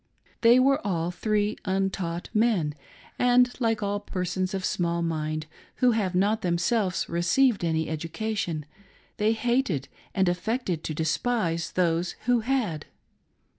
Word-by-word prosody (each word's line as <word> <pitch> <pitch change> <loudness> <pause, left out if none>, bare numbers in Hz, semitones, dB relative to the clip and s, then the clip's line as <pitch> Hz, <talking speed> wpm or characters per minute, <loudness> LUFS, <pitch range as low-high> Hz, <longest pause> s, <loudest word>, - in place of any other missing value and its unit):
They 235 +1 +7
were 275 +1 +3
all 175 -4 -1
three 210 +3 0
untaught 190 -3 -2
men, 210 -9 +2 0.5
and 245 0 +4
like 225 -3 +1
all 200 0 -1
persons 185 -1 -2
of 190 -1 -2
small 170 -1 0
mind 155 -1 -2 0.3
who 250 -1 +4
have 200 -5 0
not 205 +4 +2
themselves 180 +2 0
received 195 +7 +2
any 160 -1 0
education, 165 +1 -3 0.5
they 215 0 +2
hated 225 - 0 0.3
and 190 -2 +3
affected 180 -1 -1
to 155 - -3
despise 165 +1 -1
those 175 -1 +1
who 245 0 +3
had. 225 - -1
190 Hz, 130 wpm, -26 LUFS, 170-225 Hz, 0.5 s, They